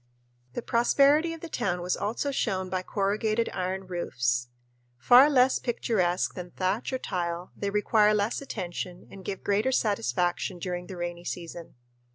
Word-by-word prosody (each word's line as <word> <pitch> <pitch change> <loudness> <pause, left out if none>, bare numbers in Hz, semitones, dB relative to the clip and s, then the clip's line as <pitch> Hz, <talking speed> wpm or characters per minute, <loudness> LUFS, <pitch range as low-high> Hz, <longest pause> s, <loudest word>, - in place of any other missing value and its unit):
The 240 - -4
prosperity 280 +7 +4
of 330 -1 -7
the 335 - -6
town 190 - -1
was 180 - 0
also 235 +7 -2
shown 190 -8 -1
by 185 -1 0
corrugated 215 +4 0
iron 190 +1 -3
roofs. 125 -9 -1 0.5
Far 245 - +7
less 260 -2 +4
picturesque 190 -7 0
than 180 -1 -7
thatch 190 +8 -1
or 260 - 0
tile, 175 -5 -3
they 200 - -2
require 210 +1 +3
less 210 +5 0
attention 180 -7 -5
and 195 - -11
give 195 0 -5
greater 210 +6 +1
satisfaction 180 - 0
during 180 0 -4
the 190 - -8
rainy 175 0 -4
season. 170 -1 -7
195 Hz, 155 wpm, -28 LUFS, 175-230 Hz, 0.5 s, Far